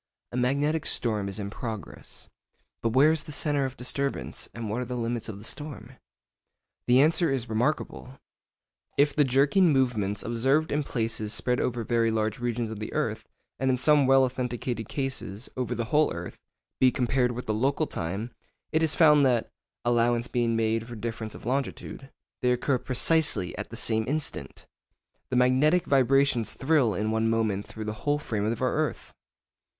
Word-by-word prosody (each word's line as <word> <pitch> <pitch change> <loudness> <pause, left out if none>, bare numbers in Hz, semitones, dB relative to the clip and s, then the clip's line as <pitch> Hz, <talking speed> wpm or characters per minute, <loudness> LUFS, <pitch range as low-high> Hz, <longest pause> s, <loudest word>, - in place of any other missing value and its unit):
A - - -7
magnetic 140 +5 +1
storm 105 -4 0
is 100 - -3
in 100 -1 -4
progress. 110 -5 -7 0.5
But 115 -1 0
where 140 +5 +6
is 160 -2 0
the 155 - -9
centre 145 -2 +1
of 130 - -10
disturbance, 140 +2 -3
and 115 -1 -6
what 110 +4 -2
are - - -3
the 125 0 -4
limits 115 -1 -3
of 105 - -6
the 100 - -12
storm? 135 -1 -7 1.0
The 125 +1 +5
answer 160 +3 +4
is 130 -3 -1
remarkable. 125 +2 -2 0.8
If 145 0 +3
the 150 - +5
jerking 140 +7 +4
movements 110 -7 0
observed 135 +7 +1
in 150 - +1
places 115 -4 -2
spread 125 0 0
over 120 -2 -1
very 115 0 +1
large 110 0 -1
regions 120 -2 -2
of 110 - -6
the 110 - -5
earth—and 130 +1 -3
in 130 - +2
some 145 +1 +4
well 135 0 +6
authenticated 125 -3 -3
cases 130 -6 -4
over 125 -1 -2
the 115 0 -2
whole 150 +1 +4
earth—be 90 +8 -2
compared 125 -1 +1
with 125 +1 -6
the 110 - -1
local 135 +8 +1
time, 100 - -4 0.4
it 160 - +2
is 160 -2 +3
found 150 -3 +6
that 120 -3 0 0.3
(allowance 120 0 +2
being 120 -2 0
made 115 0 0
for 120 - -8
difference 110 -1 -5
of - - -11
longitude) 135 +1 -3 0.3
they 125 - +3
occur 125 +1 +1
precisely 130 - +1
at - - -6
the - - -8
same 110 -1 0
instant. 145 - -4 0.6
The 130 - -2
magnetic 130 +8 +3
vibrations 135 -3 +3
thrill 135 - +2
in 110 +3 -1
one 110 0 +1
moment 110 -3 0
through 110 -1 -7
the 105 - -3
whole 145 0 +1
frame 110 -8 -3
of 115 +3 -1
our 130 - +1
earth! 155 0 -2
125 Hz, 175 wpm, -27 LUFS, 110-140 Hz, 1.0 s, where